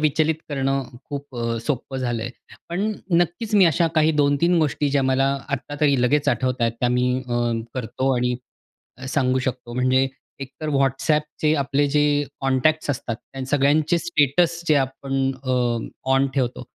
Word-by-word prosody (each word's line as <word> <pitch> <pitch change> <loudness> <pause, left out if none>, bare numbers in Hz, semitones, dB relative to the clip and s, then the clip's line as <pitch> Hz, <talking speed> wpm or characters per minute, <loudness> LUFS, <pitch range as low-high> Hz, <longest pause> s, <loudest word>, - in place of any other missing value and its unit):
विचलित 155 +1 +2
करणं 135 -1 0 0.2
खूप 140 -2 -7
अ, 115 0 -1
सोपं 135 -1 -2
झालं 120 -3 -2
आहे. 120 - -4 0.4
पण 195 +6 -1 0.3
नक्कीच 175 +6 -1
मी 195 -3 +7
अशा 165 +1 +3
काही 155 0 +4
2-3 165 +5 +3
गोष्टी 150 -1 +1
ज्या 140 -1 +2
मला 135 +1 +2 0.2
आत्ता 140 +1 -4
तरी 140 -4 +3
लगेच 145 +3 +2
आठवत 130 -1 0
आहेत, 115 -1 +2
त्या 125 - +2
मी 125 +1 +2 0.2
अ, 120 - -1 0.4
करतो 130 +2 -1
आणि 125 0 0 0.7
सांगू 130 -1 +1
शकतो. 125 -2 -4
म्हणजे 130 +1 +2 0.3
एक 135 - -6
तर 155 - -3
WhatsAppचे 150 +3 +1
आपले 140 +1 +1
जे 150 +1 +2 0.4
कॉन्टॅक्ट्स 140 +3 +1
असतात, 120 -4 -3
त्या 130 +2 -9
सगळ्यांचे 145 +4 +2
स्टेटस 170 +1 +1
जे 155 - +5
आपण 135 +1 -5 0.3
अ, 130 - 0 0.6
ऑन 135 +1 +3
ठेवतो 125 -2 -1
135 Hz, 155 wpm, -22 LUFS, 130-150 Hz, 0.7 s, मी